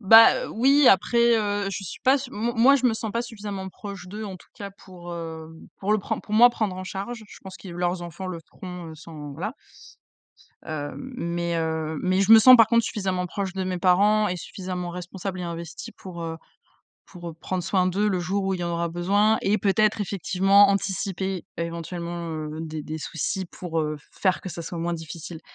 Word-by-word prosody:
bah 225 +2 +9
heu, - - -4
oui, 275 +5 +4
après, 235 +4 +4
heu, 205 -1 -1
je 195 +1 -4
suis 175 - -8
pas 260 - +5
s 265 -1 -6
m 235 0 -2
moi 260 +5 +6
je 260 - -4
me 230 - +2
sens 220 0 -4
pas 235 - 0
suffisamment 205 -5 -6
proche 200 -1 -9
d'eux 210 +4 -6
en 190 -2 -6
tout - - -20
cas 200 -1 -7
pour, 175 -2 -10
heu, 160 -1 -6 0.3
pour 200 +2 0
le 215 - +3
pren 195 - -3
pour 210 - -5
moi 240 +3 +8
prendre 215 -6 -2
en 185 - -6
charge, 200 +5 -5
je - - -13
pense 190 -1 -9
que 195 - -11
leurs 175 0 -2
enfants 175 +2 -7
le 180 -2 -4
feront, 180 -2 -8
heu, - - -9
sans 155 -2 -9
voilà 180 - -4 1.1
heu, 145 -2 -4
mais 170 -10 -3
heu, 160 -1 -2
mais 185 +1 +2
je 195 +2 +4
me 225 - +12
sens 255 +3 +10
par 225 -3 +7
contre 230 0 +3
suffisamment 190 -3 -2
proche 190 +1 -4
de 190 -1 -2
mes 185 -1 -2
parents 205 +4 +4
et 180 -2 -2
suffisamment 180 -1 -5
responsable 180 +1 -6
et - - -4
investie 170 -1 -6
pour, 180 -3 -9
heu, 165 0 -4 0.7
pour, 175 -2 -9
heu, - - -8
prendre 180 +2 -4
soin 185 0 +2
d'eux 195 +3 +1
le 190 -3 +1
jour 190 +3 -1
où 190 0 0
il - - -7
y - - -2
en 170 - -2
aura 170 0 -1
besoin 200 +6 +2
et 205 +2 +2
peut-être 210 +2 +2
effectivement 195 +1 +4
anticiper 195 -1 -2
éventuellement, 170 0 -4
heu, 155 0 -5
des 155 -1 -5
des 155 +1 -5
soucis 165 +4 -3
pour, 170 -1 -4
heu, 155 0 -2
faire 185 -2 0
que 185 - -6
ça 170 - -6
soit 170 +1 -5
moins 170 +1 -1
difficile, 165 0 -7
185 Hz, 215 wpm, -25 LUFS, 170-205 Hz, 1.1 s, me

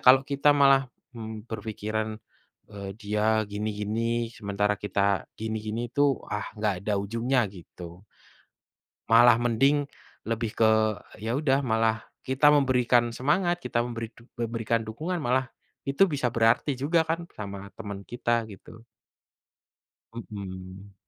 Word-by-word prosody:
kalau 130 +1 +8
kita 140 +1 +3
malah, 135 -1 +5 0.3
mmm, 110 0 -7
berpikiran, 110 0 -4 0.5
eee, 100 -1 -7
dia 105 +1 +1
gini-gini 110 +3 -2
sementara 105 0 0
kita 100 -1 0 0.2
gini-gini 110 +1 -3
itu 140 +1 +2
ah 105 0 -2
enggak 105 -3 -1
ada 105 -2 +1
ujungnya 115 +3 0
gitu, 90 0 -12 1.1
malah 115 +1 +7
mending 135 +5 +2 0.4
lebih 115 -1 -2
ke 110 -1 +4 0.5
ya 110 +3 -3
udah 140 -1 +1
malah 110 -1 +1 0.2
kita 140 +3 +4
memberikan 125 -4 +3
semangat, 175 +9 +1
kita 120 - +1
memberi 115 -2 -5
du 115 +2 -19
memberikan 115 -1 -1
dukungan 155 +12 -3
malah 130 0 +1 0.4
itu 140 +8 +3
bisa 130 -5 -1
berarti 115 +5 +3
juga 160 +5 +2
kan 170 +1 -3
sama 100 -1 -7
teman 100 -3 -6
kita 120 +2 -1
gitu. 110 +3 -13 1.3
Mhm. 95 -3 -8
115 Hz, 120 wpm, -27 LUFS, 105-130 Hz, 1.3 s, kalau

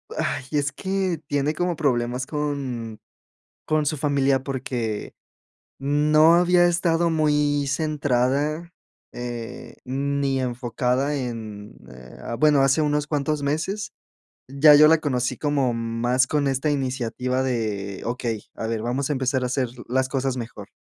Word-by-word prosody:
ay, - - -2
es 145 -1 0
que 190 +1 -2
tiene 145 +2 0
como 175 +1 -1
problemas 125 -4 0
con 130 -7 -3 0.7
con 155 -1 +1
su 150 +1 -1
familia 140 -2 +2
porque 125 -5 -3 0.6
no 150 +3 +4
había 175 0 +4
estado 170 -1 +1
muy 150 -2 +1
centrada, 145 +2 0 0.4
eh, 120 -1 -7
ni 140 +1 -1
enfocada 125 +2 -1
en, 110 -5 -6
eh, 65 0 -13 0.2
bueno 150 -2 +5
hace 135 +3 +3
unos 150 0 0
cuantos 150 0 -1
meses 170 +8 -2 0.6
ya 140 +3 +6
yo 150 +1 +8
la 160 0 +5
conocí 125 -4 -1
como 140 -4 +1
más 115 +3 0
con 145 -1 +1
esta 135 +3 0
iniciativa 130 -1 -1
de 105 -6 -3
okey, 115 -3 -3
a 110 - -4
ver, 115 -1 -2
vamos 130 +4 -2
a - - +1
empezar 130 -1 0
a - - 0
hacer 130 0 0 0.2
las 130 +1 +1
cosas 135 -1 -1
mejor. 115 -1 -7
135 Hz, 135 wpm, -24 LUFS, 125-150 Hz, 0.7 s, yo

